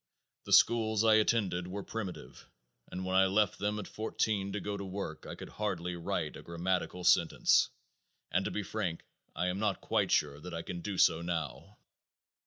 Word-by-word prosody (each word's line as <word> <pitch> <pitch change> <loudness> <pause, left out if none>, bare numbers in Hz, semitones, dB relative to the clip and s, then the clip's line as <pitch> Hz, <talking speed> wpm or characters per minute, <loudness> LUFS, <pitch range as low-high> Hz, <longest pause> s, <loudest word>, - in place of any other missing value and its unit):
The - - -1
schools 110 -2 +5
I 110 -1 +6
attended 105 -5 +2
were 100 +2 -5
primitive 90 - -7 0.4
and 95 0 -4
when 95 0 -1
I 95 0 +6
left 100 0 +2
them 105 +2 -1
at 105 - -5
fourteen 105 -2 -1
to 105 - -2
go 100 +1 -3
to 100 - -5
work 100 +1 -6
I - - -6
could - - -9
hardly 90 -4 -3
write 85 - -3
a - - -9
grammatical 90 +1 -2
sentence; - - +4 0.6
and - - +2
to - - 0
be 105 - -3
frank 95 -5 -3 0.3
I 90 - 0
am 90 +2 -1
not 105 -2 0
quite 105 -4 0
sure 75 -2 +1
that 90 +2 -7
I 85 - -4
can 85 0 -6
do 100 +1 -4
so 80 - +4
now. 85 -4 -4
95 Hz, 190 wpm, -32 LUFS, 90-105 Hz, 0.6 s, I